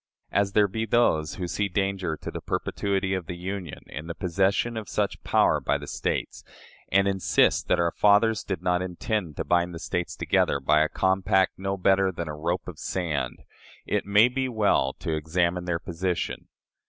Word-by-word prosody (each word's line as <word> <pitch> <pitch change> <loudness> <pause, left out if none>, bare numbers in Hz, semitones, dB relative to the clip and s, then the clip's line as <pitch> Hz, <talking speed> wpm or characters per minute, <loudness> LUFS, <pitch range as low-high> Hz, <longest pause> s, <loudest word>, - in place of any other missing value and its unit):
As 100 -1 +1
there 105 -1 +4
be 110 +3 -3
those 80 -10 +2
who 90 -2 -4
see 100 +3 -1
danger 95 -4 -1
to - - -7
the - - -6
perpetuity 95 -1 -1
of 95 -4 -3
the 90 - -5
Union 90 -3 -6
in 75 +3 -8
the 85 - -5
possession 100 +6 0
of 110 -5 -5
such - - -1
power - - +3
by - - 0
the - - -8
States, - - -3 0.5
and 100 0 +4
insist 95 -1 +2
that - - +3
our 85 -1 +2
fathers 105 +3 +3
did 95 - -4
not 90 0 +1
intend 90 -1 -3
to - - -1
bind 85 0 +1
the - - -6
States 90 0 -3
together - - +1
by 75 - +3
a 80 - +2
compact 95 0 +2
no 95 0 -2
better 95 +1 +3
than 85 -2 -5
"a 75 - -5
rope 85 +4 -2
of 85 -4 -8
sand," 85 -6 -3 0.4
it - - 0
may 105 +3 +6
be 130 +1 -2
well 105 - +2
to 80 - -4
examine 85 +3 0
their 90 -2 0
position. 90 +1 -3
95 Hz, 190 wpm, -26 LUFS, 85-100 Hz, 0.5 s, may